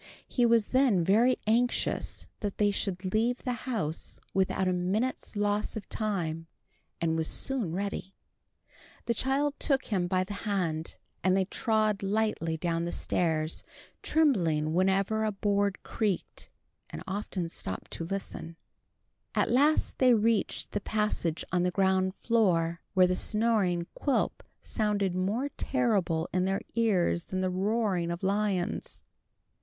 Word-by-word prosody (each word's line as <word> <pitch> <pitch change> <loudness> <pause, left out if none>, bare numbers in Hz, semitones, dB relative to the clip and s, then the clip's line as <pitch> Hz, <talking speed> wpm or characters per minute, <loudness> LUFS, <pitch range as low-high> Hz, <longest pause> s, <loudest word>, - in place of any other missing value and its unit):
He 245 -2 +2
was 230 -2 +3
then 255 -9 +3
very 230 +8 +4
anxious 235 +3 0
that 205 -2 -3
they 205 -1 +3
should 185 -2 -2
leave 235 +3 +1
the 250 - -1 0.2
house 170 -10 -3
without 190 0 +1
a 185 - +2
minute's 200 +9 -1
loss 205 +1 0
of 210 - -7
time, 165 -7 -2 0.5
and 165 -1 +1
was 160 -1 0
soon 255 -11 0
ready. 195 +1 -4 0.9
The 235 - +1
child 275 +4 +1
took 275 -3 +2
him 180 -3 +1
by 185 +1 +1
the 200 +2 -6
hand, 180 -6 -2 0.3
and 185 +1 +3
they 190 - +2
trod 215 0 +1
lightly 200 -5 0
down 170 0 -1
the 175 - -3
stairs, 160 -3 0 0.4
trembling 170 - +2
whenever 195 +4 +2
a 215 - +1
board 200 0 0
creaked, 205 -5 -2 0.4
and - - -7
often 195 -3 -3
stopping 95 - -5
to - - -4
listen. 170 -2 -5 0.8
At - - +2
last 290 +5 +3
they 255 -2 +6
reached 220 -2 0
the 205 - -2
passage 210 -6 -1
on 180 - +2
the 180 - +2
ground 190 0 +1
floor, 175 -8 +1
where 185 -1 +7
the 180 0 +1
snoring 210 -5 +2
of 170 - -11
Quilp 280 - 0 0.2
sounded 205 -4 0
more 205 +10 -1
terrible 200 -11 +1
in 185 0 +2
their 195 +1 0
ears 190 -7 +1
than 185 0 -3
the 185 0 0
roaring 195 -2 0
of 170 +2 -4
lions. 195 -2 -1
195 Hz, 145 wpm, -29 LUFS, 180-220 Hz, 0.9 s, where